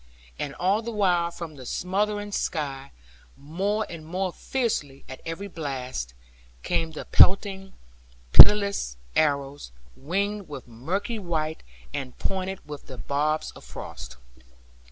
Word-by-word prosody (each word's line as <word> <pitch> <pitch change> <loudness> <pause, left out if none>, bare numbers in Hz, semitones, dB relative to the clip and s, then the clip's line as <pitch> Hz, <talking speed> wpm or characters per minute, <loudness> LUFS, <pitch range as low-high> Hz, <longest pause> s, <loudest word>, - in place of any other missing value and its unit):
And 140 -1 -3
all 195 +4 +2
the 230 - -5
while 180 -6 +2
from 170 -2 -7
the 130 - -9
smothering 205 - -1
sky, 140 -7 -2 0.5
more 195 +9 -1
and 170 -2 -8
more 180 +3 -2
fiercely 180 - -2
at 130 - -9
every 165 +5 -4
blast, 130 - -4 0.5
came 165 - 0
the - - -6
pelting, 195 0 +4 0.6
pitiless 200 - +8 0.2
arrows, 140 - +1 0.2
winged 200 +6 -2
with 135 -5 -8
murky 180 - -3
white, 160 -4 -2 0.3
and 130 -2 -5
pointed 190 -2 -3
with 150 -1 -8
the 130 - -8
barbs 145 +7 0
of - - -14
frost. 65 -3 -8
165 Hz, 125 wpm, -26 LUFS, 140-195 Hz, 0.6 s, pitiless